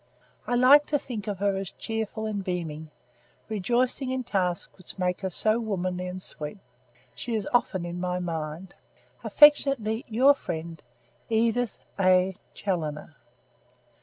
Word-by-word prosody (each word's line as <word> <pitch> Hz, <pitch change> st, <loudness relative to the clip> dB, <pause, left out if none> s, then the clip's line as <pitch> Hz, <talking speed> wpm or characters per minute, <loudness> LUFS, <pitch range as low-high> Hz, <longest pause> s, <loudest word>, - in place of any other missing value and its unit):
I 245 Hz, -, +1 dB
like 270 Hz, +4 st, +7 dB
to 295 Hz, -, +2 dB
think 230 Hz, -7 st, -6 dB
of 205 Hz, -2 st, -2 dB
her 200 Hz, 0 st, +1 dB
as 195 Hz, -1 st, -4 dB
cheerful 220 Hz, -1 st, -4 dB
and 205 Hz, -2 st, -3 dB
beaming, 160 Hz, -4 st, -4 dB, 0.6 s
rejoicing 245 Hz, +5 st, 0 dB
in 260 Hz, 0 st, -1 dB
tasks 180 Hz, -6 st, -1 dB
which 185 Hz, 0 st, -7 dB
make 180 Hz, 0 st, -1 dB
her 190 Hz, -, -1 dB
so 215 Hz, +5 st, +1 dB
womanly 185 Hz, -5 st, -2 dB
and 180 Hz, +1 st, -5 dB
sweet. 150 Hz, -1 st, -7 dB, 0.6 s
She 235 Hz, -2 st, -4 dB
is 210 Hz, -3 st, -1 dB
often, 215 Hz, -6 st, +2 dB
often -, -, -5 dB
in 175 Hz, +1 st, -5 dB
my 180 Hz, 0 st, -1 dB
mind. 165 Hz, 0 st, -4 dB, 0.5 s
"Affectionately 275 Hz, -6 st, +5 dB
your 255 Hz, +5 st, +5 dB
friend, 165 Hz, -, -6 dB, 0.5 s
"EDITH 230 Hz, +1 st, 0 dB
A. 185 Hz, 0 st, +4 dB, 0.2 s
CHALLONER." 155 Hz, -5 st, -3 dB
195 Hz, 140 wpm, -27 LUFS, 180-235 Hz, 0.6 s, like